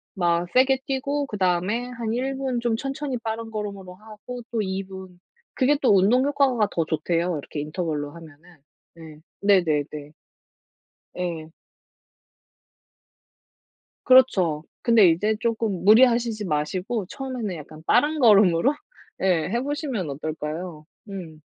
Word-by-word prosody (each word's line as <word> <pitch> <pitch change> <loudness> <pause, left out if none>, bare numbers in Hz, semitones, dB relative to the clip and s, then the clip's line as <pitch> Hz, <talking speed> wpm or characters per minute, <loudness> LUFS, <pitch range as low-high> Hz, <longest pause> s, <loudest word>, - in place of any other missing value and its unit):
막 175 -2 +1
세게 265 +1 +4
뛰고 280 +1 -1
그다음에 195 +4 0
한 235 -2 -4
1 265 +2 -2
분 265 -2 -2
좀 235 -1 0
천천히 270 0 -4
빠른 225 0 -5
걸음으로 200 -4 -6
하고 215 +5 -10
또 225 -3 0
2 190 0 -3
분. 190 -2 -11 0.3
그게 285 +2 +2
또 225 -6 +5
운동 215 +7 +4
효과가 275 -7 +2
더 165 - 0
좋대요 165 +2 -1
이렇게 145 +1 -7
인터벌로 150 -1 -3
하면은. 165 +2 -15 0.4
네. 160 -2 -12 0.2
네네네. 175 -8 +3 1.3
예. 165 -3 -4 2.5
그렇죠. 190 -12 +4 0.2
근데 225 -6 +5
이제 210 +7 +1
쪼금 225 -5 -1
무리하시지 230 -1 +4
마시고 180 +7 -2
처음에는 255 -8 -5
약간 155 0 -11
빠른 305 - +2
걸음으로 205 - +5 0.5
예. 175 -4 +1
해보시면 255 - -2
어떨까요? 155 +2 -5 0.2
음. 170 -6 -8
200 Hz, 255 characters per minute, -24 LUFS, 170-245 Hz, 2.5 s, 또